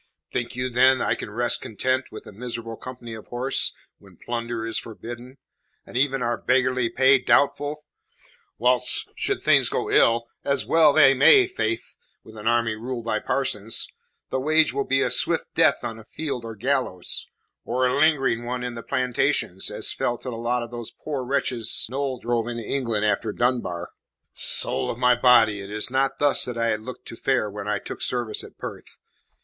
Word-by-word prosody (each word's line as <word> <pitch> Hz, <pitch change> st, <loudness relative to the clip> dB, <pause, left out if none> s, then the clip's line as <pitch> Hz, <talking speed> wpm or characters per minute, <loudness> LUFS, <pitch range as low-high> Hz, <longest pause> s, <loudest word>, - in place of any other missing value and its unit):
Think 120 Hz, -1 st, -3 dB
you, 125 Hz, 0 st, -1 dB
then, 130 Hz, +2 st, +5 dB
I -, -, +1 dB
can -, -, -6 dB
rest 120 Hz, +3 st, 0 dB
content 130 Hz, +4 st, -1 dB
with 110 Hz, -, -9 dB
a -, -, -10 dB
miserable 115 Hz, +1 st, -6 dB
company 120 Hz, -1 st, -9 dB
of 110 Hz, -1 st, -10 dB
horse 125 Hz, +2 st, 0 dB, 0.3 s
when -, -, -19 dB
plunder 115 Hz, -1 st, -4 dB
is 115 Hz, -, -2 dB
forbidden, 120 Hz, +3 st, -9 dB, 0.5 s
and -, -, -12 dB
even 135 Hz, 0 st, +1 dB
our 120 Hz, 0 st, -1 dB
beggarly 130 Hz, -2 st, +2 dB
pay 130 Hz, +3 st, +5 dB
doubtful? 145 Hz, +3 st, +1 dB, 0.7 s
Whilst, 125 Hz, +1 st, +1 dB
should -, -, -1 dB
things -, -, +5 dB
go -, -, -2 dB
ill 115 Hz, 0 st, +4 dB, 0.2 s
as 140 Hz, 0 st, 0 dB
well 160 Hz, -2 st, +5 dB
they 140 Hz, -2 st, +6 dB
may, 375 Hz, -, +7 dB
faith, 115 Hz, -, -3 dB, 0.3 s
with 110 Hz, -, -14 dB
an 105 Hz, +1 st, -6 dB
army 115 Hz, -1 st, +2 dB
ruled 120 Hz, +1 st, -5 dB
by 110 Hz, -2 st, 0 dB
parsons 115 Hz, -5 st, -1 dB, 0.4 s
the 130 Hz, -, 0 dB
wage 155 Hz, +1 st, +3 dB
will 140 Hz, 0 st, -1 dB
be 135 Hz, 0 st, +2 dB
a -, -, 0 dB
swift -, -, +2 dB
death -, -, +3 dB
on 115 Hz, 0 st, -6 dB
field 135 Hz, -5 st, -5 dB
or 115 Hz, -1 st, -7 dB
gallows, 125 Hz, -6 st, -2 dB, 0.4 s
or 130 Hz, +2 st, 0 dB
a 125 Hz, -, +1 dB
lingering 140 Hz, -6 st, +2 dB
one 125 Hz, +1 st, -3 dB
in 125 Hz, -1 st, -4 dB
the 115 Hz, -, -6 dB
plantations, 125 Hz, -1 st, 0 dB
as -, -, -2 dB
fell 120 Hz, -, -1 dB
to 130 Hz, -, -7 dB
the -, -, -5 dB
lot 120 Hz, +1 st, -1 dB
of 120 Hz, -, -9 dB
those 120 Hz, -2 st, -6 dB
poor 145 Hz, -4 st, -5 dB
wretches 125 Hz, -3 st, 0 dB
Noll 135 Hz, -1 st, -2 dB
drove 120 Hz, -1 st, -1 dB
into 120 Hz, -1 st, -4 dB
England 115 Hz, -4 st, -1 dB
after 105 Hz, +1 st, 0 dB
Dunbar. 110 Hz, -8 st, -1 dB, 0.4 s
Soul -, -, 0 dB
of -, -, -3 dB
my 125 Hz, 0 st, +4 dB
body, 115 Hz, -4 st, +4 dB
it 100 Hz, -, -8 dB
is 105 Hz, +3 st, -2 dB
not 135 Hz, +1 st, +1 dB
thus 145 Hz, -1 st, +2 dB
that 125 Hz, -2 st, -5 dB
I 115 Hz, 0 st, +1 dB
had 110 Hz, -, -1 dB
looked 125 Hz, +2 st, -9 dB
to -, -, -8 dB
fare 115 Hz, -4 st, 0 dB
when 100 Hz, 0 st, -6 dB
I 105 Hz, -, 0 dB
took -, -, -8 dB
service 120 Hz, -3 st, -2 dB
at -, -, -13 dB
Perth. -, -, -9 dB
120 Hz, 190 wpm, -24 LUFS, 115-130 Hz, 0.7 s, may